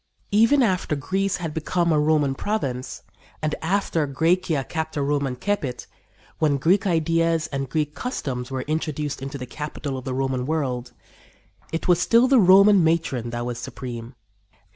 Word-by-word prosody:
Even 230 +7 +5
after 185 -7 0
Greece 190 +7 -1
had 165 -4 -5
become 170 +2 0
a 155 - +3
Roman 150 -2 +2
province, 135 -8 -3 0.4
and 155 -1 -1
after 165 -3 0
Græcia 160 0 +1
capta 160 -2 -3
Romam 140 -2 0
cepit 145 -9 -2 0.5
when 150 -3 +2
Greek 185 +9 +2
ideas 165 -1 +1
and 135 -1 -2
Greek 150 +1 -1
customs 135 - -4
were 130 -1 -3
introduced 150 -2 -3
into 135 +1 -5
the 125 - -6
capital 145 0 -5
of 130 - -12
the 130 -1 -3
Roman 130 -1 -1
world 130 -6 -2 0.8
it 165 - -3
was 175 -1 +4
still 235 +6 +4
the 265 -1 +5
Roman 195 0 +7
matron 160 -7 0
that 120 0 -4
was 120 -1 -4
supreme. 120 -1 -7
155 Hz, 155 wpm, -23 LUFS, 135-175 Hz, 0.8 s, Roman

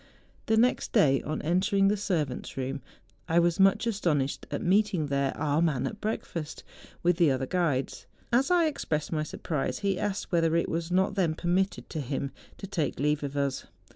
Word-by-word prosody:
The 220 - +3
next 245 +3 +2
day, 140 - +4
on 155 +1 -4
entering 190 +4 +2
the 200 - +3
ser¬ 190 -6 0
vants' 130 0 -8
room, 135 +1 -3 0.5
I 165 - +2
was 170 0 +3
much 195 +4 +4
astonished 165 - -1
at - - -3
meeting 190 -3 +2
there 140 -1 +1
our 150 +1 +1
man 155 -7 +1
at 210 - -5
breakfast, 170 -7 -4 0.4
with 175 -1 +3
the 170 -4 +4
other 130 -1 0
guides. 150 -5 -1 0.3
As 260 +6 +3
I 350 -2 +4
expressed 160 - -2
my 155 -2 0
surprise, 155 -1 -3
he 195 -2 +1
asked 205 -1 -3
whether 165 -2 +2
it 170 - +1
was 165 +1 -2
not 190 +3 +2
then 175 -5 +1
permitted 185 +4 0
to 155 - -3
him 135 +1 -3 0.3
to - - -7
take 175 -6 -2
leave 150 +1 +1
of 140 0 -4
us. 140 -1 -1
170 Hz, 190 wpm, -28 LUFS, 145-195 Hz, 0.5 s, day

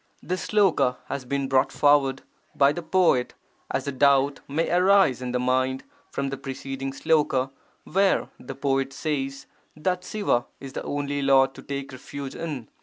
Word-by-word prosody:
[This 185 -1 -3
sloka 190 -12 +3
has 135 -2 -4
been 140 +1 -1
brought 135 0 +2
forward 140 -2 +3 0.3
by 140 0 +5
the 175 - -4
poet 165 -7 +2 0.3
as - - -2
a - - 0
doubt 140 +1 +3
may 155 +4 0
arise 180 -7 +4
in 125 -1 -3
the 125 - 0
mind 130 +1 0 0.3
from 140 0 -2
the 135 - -4
preceding 135 0 -5
sloka 135 -3 +1 0.3
where 195 +1 +2
the - - -8
poet 135 -1 0
says 135 -2 -3 0.3
that 180 +3 -1
Siva 180 - 0
is 135 -1 -9
the - - -4
only 145 0 -2
Lord 135 -1 +4
to - - -11
take 140 -1 -5
refuge 135 +1 -7
in. 145 -9 -5
140 Hz, 165 wpm, -25 LUFS, 135-155 Hz, 0.3 s, by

